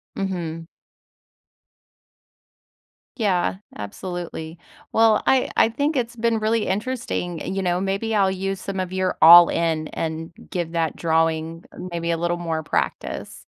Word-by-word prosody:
Mhm. 170 -4 -4 2.5
Yeah, 185 -6 +1 0.2
absolutely. 165 - -6 0.4
Well, 225 -1 +4
I 265 -1 +3
I - - +6
think 285 +5 -1
it's 240 -1 -2
been 230 -1 +1
really 215 0 +1
interesting, 205 -5 -2
you 195 - -1
know, 180 0 0
maybe 200 +3 -1
I'll 195 -2 +3
use 195 0 -3
some 195 -1 -4
of 185 0 -3
your, 185 -1 -1
"all-in" 165 -1 +7
and 160 0 -4 0.2
give 170 -2 -3
that 165 -2 0
drawing 165 0 0 0.3
maybe 170 0 -2
a 165 - 0
little 175 +1 -1
more 165 -2 -3
practice. - - -3
180 Hz, 130 wpm, -23 LUFS, 165-205 Hz, 2.5 s, all-in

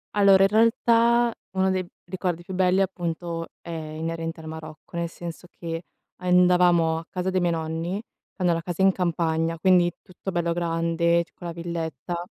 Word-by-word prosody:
Allora, 195 -2 +6
in 195 - +5
realtà 230 +2 +4 0.2
uno 190 0 +1
dei 185 -1 0 0.2
ricordi 180 -2 -2
più 190 - -8
belli, 185 +1 +3
appunto, 170 -2 -3
è - - -11
inerente 165 +1 -4
al 160 - -9
Marocco, 155 +1 -9
nel 170 0 -1
senso 170 +1 -8
che 165 -1 -6 0.4
andavamo 180 -2 +4
a 165 - -11
casa 185 0 -2
dei 185 0 +1
miei 175 -1 +2
nonni. 165 +5 -3 0.4
Hanno 180 -2 +3
la 165 - -1
casa 175 +1 -4
in 195 - +6
campagna, 165 -2 0
quindi 175 0 +4
tutto 190 +1 -7
bello 170 -2 0
grande, 170 0 +1
c - - -26
con 175 - -8
la 170 - -4
villetta, 170 0 -4
175 Hz, 170 wpm, -25 LUFS, 165-185 Hz, 0.4 s, Allora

